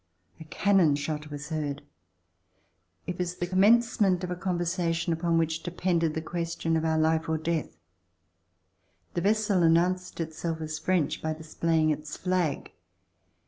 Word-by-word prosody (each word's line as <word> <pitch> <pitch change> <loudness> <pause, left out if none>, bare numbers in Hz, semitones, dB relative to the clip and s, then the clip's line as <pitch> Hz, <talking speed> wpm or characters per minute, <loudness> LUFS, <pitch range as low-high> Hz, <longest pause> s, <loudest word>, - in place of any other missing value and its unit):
A 160 - -9
cannon 180 -2 +3
shot 150 +1 -4
was 145 +1 -7
heard. 145 -3 -3 1.2
It 180 0 -5
was 180 0 -2
the 175 - -2
commencement 195 0 +3
of 180 - -3
a - - -1
conversation 175 -2 -1
upon 165 0 +1
which 160 0 0
de - - -4
pended 170 -2 0
the 160 - -3
question 165 -1 -2
of 160 - 0
our 160 -1 +1
life 160 +1 +1
or 160 - +1
death. 160 0 -2 1.4
The 175 - -1
vessel 205 -1 +2
announced 175 +3 +2
itself 160 0 -3
as 155 -1 -4
French 170 -2 0
by 160 0 -1
displaying 160 0 0
its 150 0 -4
flag. 180 -5 -1
165 Hz, 145 wpm, -28 LUFS, 160-180 Hz, 1.4 s, cannon